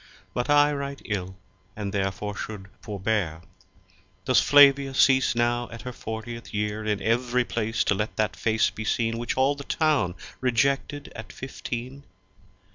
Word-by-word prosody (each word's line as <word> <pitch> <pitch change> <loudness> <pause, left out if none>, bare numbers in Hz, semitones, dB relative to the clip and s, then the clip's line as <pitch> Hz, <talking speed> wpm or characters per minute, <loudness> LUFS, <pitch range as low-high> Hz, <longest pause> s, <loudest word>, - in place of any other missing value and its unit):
But 120 - -2
I 145 0 +5
write 140 -1 -5
ill 95 -3 -3 0.4
and 100 -2 -4
there 95 -1 +1
fore 105 +2 -6
shou'd 100 -3 -7
forbear. 100 -6 -2 0.8
Does 130 - +4
Flavia 140 -1 +6
cease 130 -3 +4
now 120 0 +1
at 115 - -9
her 125 - -5
fortieth 115 +1 -7
year 105 +1 -2
In 105 -1 0
ev'ry 120 +3 +1
Place 115 -1 -1
to - - +2
lett 105 +2 -3
that 110 -1 0
face 110 -1 +1
be 110 - -6
seen 115 +1 0
Which 120 - -3
all 135 +2 +4
the 140 0 -8
Town 145 - +1 0.2
rejected 135 +3 0
at 110 -4 -8
fifteen? 130 +2 -6
115 Hz, 155 wpm, -26 LUFS, 105-135 Hz, 0.8 s, Flavia